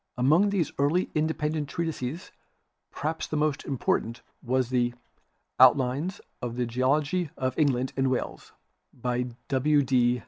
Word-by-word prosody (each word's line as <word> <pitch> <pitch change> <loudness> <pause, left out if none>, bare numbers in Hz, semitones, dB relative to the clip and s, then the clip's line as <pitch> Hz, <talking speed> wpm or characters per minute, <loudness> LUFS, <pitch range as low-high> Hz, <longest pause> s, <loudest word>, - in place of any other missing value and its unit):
Among 155 +11 +4
these 190 -7 0
early 155 +6 +2
independent 155 -1 -1
treatises 160 -1 -4 0.6
perhaps 160 +2 -3
the 155 - -2
most 150 -1 0
important 115 -3 -1 0.2
was 130 0 0
the 120 -1 +1 0.6
"Outlines 130 +7 +4 0.2
of 120 -1 -4
the 125 0 0
Geology 145 +8 0
of 130 -1 -1
England 130 -4 +1
and 135 -1 +1
Wales" 130 - -3 0.4
by 125 0 -2 0.2
W. 145 +2 +3
D. 125 -2 +2
135 Hz, 130 wpm, -27 LUFS, 125-155 Hz, 0.6 s, Among